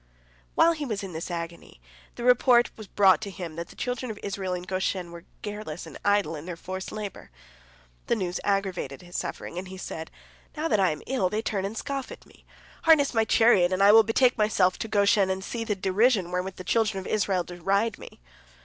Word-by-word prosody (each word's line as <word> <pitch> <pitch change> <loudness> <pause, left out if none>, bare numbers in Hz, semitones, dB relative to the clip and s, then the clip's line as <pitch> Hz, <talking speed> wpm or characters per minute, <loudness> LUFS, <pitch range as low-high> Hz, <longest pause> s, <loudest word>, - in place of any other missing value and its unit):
While 335 - +6
he 310 -3 -3
was 215 -7 -3
in 190 -3 -7
this 160 +3 -5
agony, 170 - -6 0.4
the 240 - -6
report 245 0 +5
was 215 -2 -10
brought 195 -1 +4
to 205 - -5
him 175 -5 -7
that 170 +1 -5
the - - -15
children 250 0 -3
of 215 - -5
Israel 195 -2 -3
in 175 - -6
Goshen 185 -1 -2
were 170 0 -11 0.2
careless 205 -6 -6
and 160 - -11
idle 205 -4 +2
in 150 +3 -8
their 180 - -4
forced 185 +2 -6
labor. 210 -3 -7 0.8
The - - +2
news 180 -4 -2
aggravated 190 -8 -2
his 175 0 -13
suffering, 175 - -4
and 185 - -7
he 190 0 -9
said: 160 -3 -6 0.5
"Now 310 +2 0
that 210 - +2
I 190 -2 +4
am 150 -1 -5
ill, 230 -9 0
they 215 +3 -2
turn 200 -3 -1
and 210 +3 -5
scoff 275 +1 -4
at - - -11
me. - - -22 0.4
Harness 310 -4 +5
my 225 -1 +2
chariot, 210 -7 +4
and 185 +1 +2
I 200 - +8
will 225 +1 +9
betake 225 +3 +2
myself 195 -4 +2
to - - -3
Goshen, 200 -2 +3
and 190 0 -2
see 230 +3 -4
the 215 -2 -1
derision 195 0 +2
wherewith 180 +1 -2
the 185 - -8
children 215 -1 +1
of 190 - -8
Israel 195 -4 0
deride 195 +5 -1
me." - - -12
195 Hz, 215 wpm, -26 LUFS, 180-220 Hz, 0.8 s, will